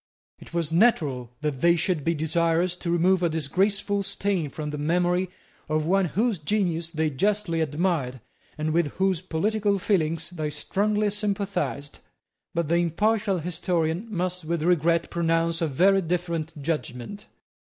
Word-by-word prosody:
It - - -13
was 165 -2 -2
natural 150 - +2
that 150 -4 -2
they 170 0 +5
should 170 -2 0
be 165 +2 +1
desirous 170 +3 +1
to 175 - -4
remove 175 +2 +3
a 170 - +2
disgraceful 195 +7 +1
stain 195 -4 -1
from 150 +1 -5
the 150 - -4
memory 175 +4 +1 0.4
of 155 0 +1
one 190 +3 +3
whose 210 - 0
genius 170 -1 0
they 160 -2 -1
justly 195 +2 0
admired, 150 -4 -1 0.4
and 155 0 -1
with 165 -4 +1
whose 190 -3 +1
political 200 +4 0
feelings 165 -4 0
they 155 -4 -3
strongly 205 +7 0
sympathized; 200 -9 -2 0.6
but 170 -2 0
the 170 +2 +2
impartial 200 +4 +1
historian 170 +2 -1
must 180 -2 -2
with 165 0 -2
regret 170 -1 +2
pronounce 165 0 +1
a 165 - +2
very 190 +7 +4
different 165 -2 -2
judgment. 150 - -4
170 Hz, 145 wpm, -25 LUFS, 155-190 Hz, 0.6 s, they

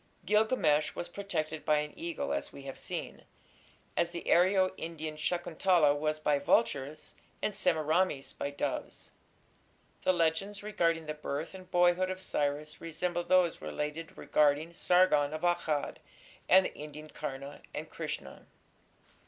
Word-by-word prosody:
Gilgamesh 210 -9 +3
was 175 - -4
protected 165 -5 -3
by 150 - +3
an 150 0 -2
eagle, 170 - -3
as 70 - -3
we 140 - -11
have 135 -1 -7
seen, - - -5 0.7
as 170 0 +2
the 170 0 -6
Aryo 185 +2 +4
Indian 160 -2 -5
Shakuntala 170 -1 +2
was 155 +1 -1
by 150 -2 +2
vultures 145 - +1 0.3
and 210 - -1
Semiramis 160 -5 +1
by 140 - -3
doves. 145 - -4 0.9
The - - +4
legends 180 +4 0
regarding 165 -6 +1
the 155 - -3
birth 150 +2 -4
and 185 -1 -11
boyhood 175 +1 +3
of 185 0 -4
Cyrus 150 -4 -2
resemble 175 +2 -2
those 180 -2 +3
related 150 - -4
regarding 150 +2 +2
Sargon 165 -5 +3
of 155 - -5
Akkad 160 -4 0 0.5
and 190 +1 +7
the - - -3
Indian 150 +1 -9
Karna 140 -1 -6
and - - -5
Krishna. - - -6
160 Hz, 135 wpm, -31 LUFS, 150-180 Hz, 0.9 s, and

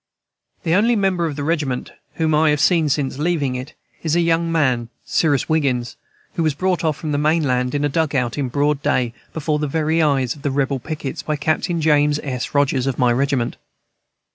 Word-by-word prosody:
The 165 - +1
only 225 +6 +3
member 190 -5 +1
of 150 - -4
the 145 - -4
regiment 145 -5 -1 0.2
whom 160 -1 +1
I 155 +1 +4
have 150 0 +2
seen 165 -2 +3
since 135 -1 -1
leaving 150 -5 0
it 130 +5 -6 0.3
is 160 -1 0
a - - +3
young 165 0 +1
man, 130 -8 +1 0.2
Cyrus 145 -6 +1
Wiggins, 135 -7 0 0.4
who - - -2
was 155 -3 +1
brought 185 +2 0
off 155 -3 0
from 155 - -4
the 145 - 0
main 155 +2 +2
land 125 -1 0
in 145 0 +1
a - - +3
dug 150 0 0
out, 125 -3 0
in 140 -3 -2
broad 145 +2 +1
day, 120 -4 0 0.2
before 155 -1 -1
the 150 - -1
very 160 +2 +1
eyes 135 -5 +2
of 145 - -14
the 145 - -1
rebel 135 0 0
pickets, 150 0 -5
by 155 - -2
Captain 160 +3 -1
James 150 -1 +3
S. 130 0 -4
Rogers, 135 -2 +2
of 135 - -1
my 125 -1 +3
regiment. 135 -1 0
150 Hz, 210 wpm, -20 LUFS, 135-160 Hz, 0.4 s, I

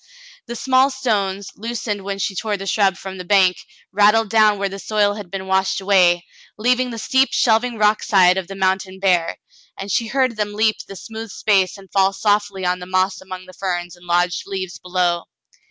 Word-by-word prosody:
The 240 - -6
small 260 +3 +3
stones, 205 -7 -2
loosened 215 -2 -4
when 195 0 -4
she 195 0 -2
tore 210 +2 -2
the 195 - -7
shrub 195 -1 +1
from 190 -1 -8
the - - -5
bank, 185 -1 +3 0.3
rattled 210 +2 +3
down 215 -2 +4
where 200 0 -1
the 195 +1 -7
soil 205 0 +1
had 205 -3 -9
been 190 0 -5
washed 190 0 +1
away, 180 -3 +3 0.3
leaving 250 +3 +1
the 230 - -6
steep 260 +4 +2
shelving 230 +1 +2
rock 210 0 +3
side 185 -3 +4
of 190 -2 -3
the 195 - -8
mountain 190 0 -1
bare, 180 -4 +1 0.4
and 195 +1 -6
she 230 - 0
heard 255 -2 0
them 210 -1 -2
leap 215 0 +2
the 195 - -9
smooth 225 +3 -8
space 195 -2 +1
and 195 -1 -16
fall 195 0 +2
softly 205 -2 0
on 180 0 0
the 180 - -9
moss 185 +1 0
among 185 -1 -9
the 185 - -14
ferns 175 -1 -4
and 175 0 -18
lodged 175 +1 0
leaves 190 -2 -5
below. 180 -1 -1
195 Hz, 200 wpm, -20 LUFS, 185-215 Hz, 0.4 s, down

